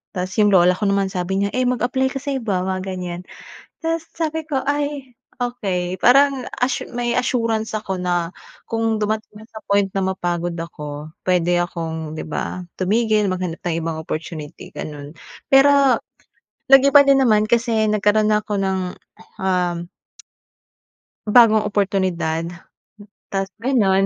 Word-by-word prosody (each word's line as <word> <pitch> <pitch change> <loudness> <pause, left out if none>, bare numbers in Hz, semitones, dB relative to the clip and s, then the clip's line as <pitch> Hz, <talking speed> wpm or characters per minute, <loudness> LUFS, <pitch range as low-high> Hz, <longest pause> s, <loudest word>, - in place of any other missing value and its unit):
Tapos 180 0 -2
'yong 205 -1 +4
lola 180 0 +5
ko 210 - -2
naman 200 -1 +1
sabi 190 +2 -1
niya, 200 - +1
eh, 255 - +2
mag-apply 250 +2 +1
ka 270 - -4
sa 280 -2 -1
iba, 200 -7 -1
mga 185 0 -3
ganyan. 180 -2 -5 0.6
Tapos 330 0 -2
sabi 320 -1 -2
ko 275 -4 -1
ay, 285 -2 -2 0.3
okey, 190 -7 -2
parang 275 +2 +4 0.2
assu 250 - 0
may 240 0 0
assurance 230 -3 -1
ako 195 -3 -3
na 175 -2 -1 0.4
kung 225 -1 0
dumating 215 0 -2
nga 220 - -14
sa - - -16
point 200 -1 +2
na 195 0 -2
mapagod 175 -1 -2
ako, 150 -3 -7 0.2
pwede 175 -1 +2
akong, 160 -3 -4
'di 155 - -5
ba, 180 +4 -3 0.2
tumigil, 215 +2 +2
maghanap 185 -3 -3
ng 170 - 0
ibang 160 -1 -3
opportunity, 155 -1 -6
gano'n. 150 +1 -8 0.3
Pero 275 -2 +6 0.7
nag-iba 275 +2 +7
din 270 -1 +5
naman 215 -2 +3
kasi 230 -2 +2
nagkaroon 210 0 +2
na 210 0 +2
ako - - -6
ng, 190 -1 0 0.6
um. 180 -2 -1 1.4
Bagong 220 -1 +6
oportunidad, 185 -5 0 0.8
tapos 195 -1 -1 0.2
gano'n 200 -7 +3
200 Hz, 140 wpm, -21 LUFS, 180-245 Hz, 1.4 s, nag-iba